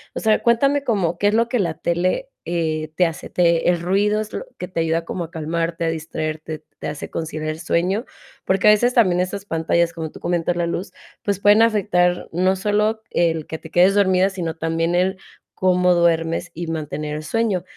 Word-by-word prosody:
O - - -2
sea, 220 -1 +2
cuéntame 275 +4 +3
como 190 -9 0
qué 205 - +2
es 205 - +2
lo 230 +1 +2
que 245 -2 0
la 170 -4 0
tele, 180 - -1 0.2
eh, 155 -2 -2
te 180 - +4
hace, 165 -1 -5
te 170 -2 +2
¿el 175 -1 +1
ruido 205 +4 +1
es 215 - -7
lo - - -5
que 180 - -5
te 175 - -3
ayuda 165 0 0
como 170 0 -4
a 165 - -15
calmarte, 165 +1 -2
a 165 - +1
distraerte, 155 -1 -4 0.2
te - - -5
hace 150 - -6
conciliar 155 -1 -4
el 155 +1 -4
sueño?, 180 +7 0 0.4
porque 190 +2 +2
a - - +9
veces 240 +4 +3
también 185 -7 +3
esas 190 +2 -2
pantallas, 165 0 +1
como 160 -2 -6
tú - - -12
comentas, 175 0 0
la 175 -1 0
luz, 180 +2 -4 0.3
pues 200 -2 -1
pueden 205 +2 +6
afectar 185 -5 +2
no 185 +3 +2
solo 210 +3 0
el 165 -2 0
que 160 - -5
te 160 - -12
quedes 185 +4 +4
dormida, 190 -1 +3
sino 175 -4 -4
también 165 +1 -1
el 185 +2 +1 0.4
cómo 180 -1 +3
duermes 170 0 +1
y 170 +1 -5
mantener 150 -1 -4
el 155 - -6
sueño. 210 -2 0
175 Hz, 205 wpm, -21 LUFS, 165-200 Hz, 0.4 s, a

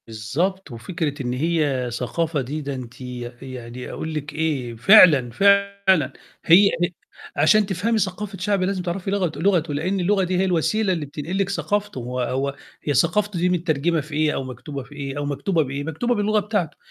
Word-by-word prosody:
بالضبط، 145 - -2
وفكرة 145 +4 -4
إن 125 -1 -2
هي 145 -3 0
ثقافة 150 +6 -1
دي 145 +5 -4
ده 140 -1 -4
أنتِ 125 -1 -9 0.4
يعني 125 -2 -8
أقول 160 0 -5
لِك 145 -1 -5
إيه؟ 145 -7 -2
فعلًا، 145 - +7
فعلًا 200 -1 +3 0.3
هي 195 +5 +7
هي 175 +1 +1 0.4
عشان 205 +9 +4
تفهمي 200 +4 0
ثقافة 195 +1 -3
شعب 195 +1 0
لازم 190 0 -1
تعرفي 180 +2 -3
لغت 185 -5 -1
لغتُه 170 -4 +1
لأن 180 +7 -1
اللغة 190 +2 +2
دي 180 0 0
هي 190 - +2
الوسيلة 190 +3 +1
اللي 160 -4 -3
بتنقل 150 +6 -5
لِك 195 -1 0
ثقافتُه، 205 -2 -2
هو 125 +1 -4
هو 135 +3 -1 0.3
هي 145 - 0
ثقافته 205 +5 +1
دي 180 +1 +2
متّرجمة 165 -2 +1
في 150 +1 -9
إيه؟ 155 0 +2
أو - - -2
مكتوبة 130 +2 -7
في 145 +3 -15
إيه؟ 140 -1 -5
أو 145 - -2
مكتوبة 160 +4 0
بإيه؟ 140 +1 -4
مكتوبة 200 +11 -1
باللغة 210 0 +2
بتاعتُه، 205 -7 -2
160 Hz, 180 wpm, -22 LUFS, 140-195 Hz, 0.4 s, فعلًا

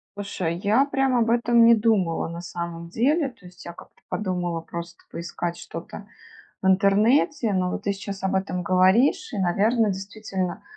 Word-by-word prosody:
Слушай, 185 -4 -3
я 210 +8 +3
прям 270 -2 0
об 230 -1 +2
этом 235 0 +4
не 235 0 +8
думала 205 -8 +1
на 170 +1 -7
самом 170 -1 -6
деле. 275 - +1
То 230 -7 -18
есть, 180 0 -14
я 170 - -7
как-то - - -16
подумала 180 -4 -2
просто 170 +1 -8
поискать 170 0 -4
что-то 170 +4 -9 0.6
в - - -1
интернете, 215 +6 +3
но 185 -1 0
вот - - -5
ты 200 - +1
сейчас 195 0 -7
об 190 0 0
этом 190 -1 -1
говоришь, 205 - +3
и, 210 - -4
наверно, 210 +5 +2
действительно, 195 -1 -4
195 Hz, 165 wpm, -24 LUFS, 175-230 Hz, 0.6 s, не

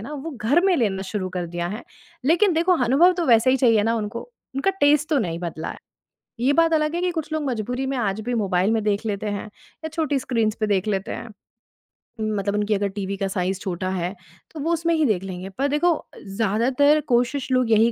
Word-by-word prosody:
ना 235 +8 -8
वो 300 +2 -5
घर 280 +10 +4
में 385 - +4
लेना 200 -8 0
शुरू 190 -1 -3
कर 180 -1 -3
दिया 175 +1 -3
है। 210 +6 -5 0.4
लेकिन 350 +7 +4
देखो, 335 +3 +2
अनुभव 300 +10 +5
तो 345 -2 -1
वैसे 235 +1 +5
ही 265 - +3
चाहिए 230 -5 +4
ना 225 +2 +1
उनको, 220 +1 -3 0.3
उनका 275 +9 +1
टेस्ट 295 +1 +4
तो 300 - +2
नहीं 170 -4 -2
बदला 170 -2 -5
है। - - -9 0.6
ये 265 +4 +3
बात 330 0 +3
अलग 305 +1 +1
है 345 - -1
कि 360 0 +1
कुछ 320 -2 -4
लोग 310 -1 -1
मजबूरी 245 +2 -2
में 275 - -1
आज 210 -3 -1
भी 245 +3 -3
मोबाइल 195 -2 +1
में 225 -1 +1
देख 210 +1 0
लेते 210 -1 -2
हैं 205 +1 -3 0.4
या - - -2
छोटी 310 -3 -1
स्क्रीन्स 225 -4 0
पे 215 - 0
देख 200 0 +1
लेते 195 0 -1
हैं। - - -6 0.9
उम, 215 0 -1
मतलब 200 +1 -1
उनकी 210 +1 +1
अगर 200 0 +1
टीवी 195 0 -3
का 195 - -1
साइज़ 190 0 -2
छोटा 185 -2 -3
है, 180 -1 -2 0.4
तो 315 - -8
वो 330 +4 0
उसमें 335 0 +1
ही 315 - +2
देख 200 -7 +1
लेंगे 185 0 -6
पर 275 +2 +1
देखो 300 +5 +2
अ, 310 - -10
ज़्यादातर 235 +9 +2
कोशिश 250 +2 +1
लोग 255 -3 +2
यही 225 +2 +5
230 Hz, 230 wpm, -23 LUFS, 200-290 Hz, 0.9 s, अनुभव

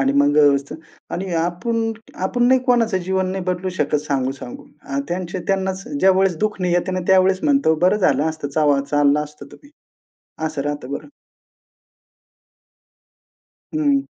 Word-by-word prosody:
आणि 135 0 +2
मग 145 +1 +3
अ, - - +8
व्यवस्था 140 0 +2 0.4
आणि 185 0 -4
आपण 225 +8 -1 0.3
आपण 245 +5 -1
नाही 260 0 +4
कोणाचं 230 -6 +2
जीवन 190 0 0
नाही 190 -1 -4
बदलू 185 +1 -2
शकत 150 +1 +1
सांगू-सांगू. 135 -2 -3 0.2
अ, 140 0 -4
त्यांचे 175 0 -3
त्यांनाच 190 0 -1
ज्यावेळेस 190 - +3
दुःखने 195 -3 -1
येते 175 +2 0
ना 185 - -1
त्यावेळेस 190 0 +4
म्हणतो 275 - +3
"बरं 195 +3 +3
झालं 150 -8 +2
असतं, 155 -2 -5
चवा 145 -1 +2
चाललो 145 0 +3
असतो 150 -1 -13
तर - - -11
मी." 285 - -17 0.8
असं 140 -3 -3
राहतं 145 -2 -4
बरं. 140 - -6 2.7
हं. 285 -3 +2
180 Hz, 150 wpm, -20 LUFS, 145-195 Hz, 2.7 s, अ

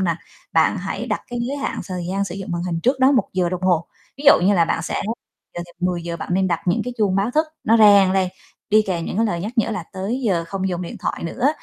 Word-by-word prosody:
là 170 -4 +1 0.4
bạn - - +3
hãy - - -4
đặt - - -1
cái 240 - -3
giới 270 +4 -3
hạn 280 - -3
thời 180 -2 -4
gian 195 +1 0
sử 180 -2 -6
dụng 195 -1 -7
màn 170 0 -2
hình 170 -2 -2
trước 260 +7 +1
đó 265 +2 +6
1 250 - +2
giờ 180 -2 +1
đồng 185 +1 -4
hồ. 175 -3 +2 0.3
Ví 280 - -9
dụ 285 - +11
như 200 - +4
là 170 -2 +4
bạn 165 - -1
sẽ - - -2 0.5
dự 175 - -4
định 175 - -19
10:00 170 -2 -3
bạn - - -7
nên 190 0 +2
đặt 170 -1 0
những 175 - +2
cái 250 - -4
chuông 195 -3 +2
báo 200 +4 +1
thức 310 +5 +2 0.2
nó 225 +1 +4
reng 200 -3 +6
lên, 190 -1 +2 0.4
đi 215 +1 +5
kèm 170 -3 -2
những - - -4
cái 225 +1 +2
lời 175 -4 -2
nhắc 210 +5 -4
nhở 225 - +2
là 195 - -3
"tới 200 +7 -3
giờ 170 -4 +1
không 190 -1 -2
dùng 180 -1 -3
điện 170 - -7
thoại - - -3
nữa" 240 +11 0
190 Hz, 280 wpm, -21 LUFS, 175-220 Hz, 0.5 s, dụ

